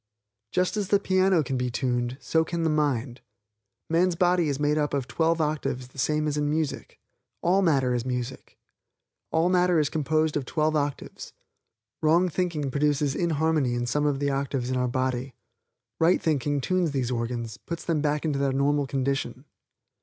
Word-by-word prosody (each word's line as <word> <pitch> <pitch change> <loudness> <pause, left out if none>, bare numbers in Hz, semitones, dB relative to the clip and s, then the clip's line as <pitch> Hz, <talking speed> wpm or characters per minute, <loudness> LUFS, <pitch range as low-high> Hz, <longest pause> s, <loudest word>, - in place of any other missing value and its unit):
Just 180 +3 0
as 205 -2 -1
the 200 +1 +3
piano 185 -3 +2
can 135 -1 -2
be 125 0 -1
tuned, 120 0 -1
so 160 0 +1
can 165 0 -3
the 160 - +2
mind. 135 -5 -1 0.7
Man's 175 +2 +2
body 175 -2 +2
is 140 -1 -2
made 145 0 +2
up 150 -1 0
of 135 -3 -2
twelve 165 0 +1
octaves 150 -5 -2
the 135 - -12
same 150 +3 +1
as 150 0 -1
in 145 0 0
music. 155 -1 -3 0.4
All 185 +3 +3
matter 135 -8 +2
is 120 -1 -1
music. 125 0 -5 0.7
All 160 +2 +2
matter 180 -2 +3
is 150 -2 +1
composed 155 0 0
of 145 - 0
twelve 155 +4 0
octaves. 145 -2 -3 0.7
Wrong 170 +4 +3
thinking 165 -4 -1
brings 145 +1 +1
inharmony 155 -5 +1
in 120 0 -1
some 150 +4 0
of 145 -2 +1
the 140 0 0
octaves 135 -2 -2
of 130 - 0
our 125 0 +1
body. 130 0 -2 0.6
Right 165 +3 +4
thinking 145 -2 0
tunes 180 -1 0
these 130 -3 -1
organs, 115 -2 -3
puts 170 +6 -7
them 160 -3 0
back 150 +1 0
into 145 -3 0
their 140 -1 +1
normal 140 +1 +1
condition. 135 -1 -2
145 Hz, 175 wpm, -26 LUFS, 130-160 Hz, 0.7 s, Right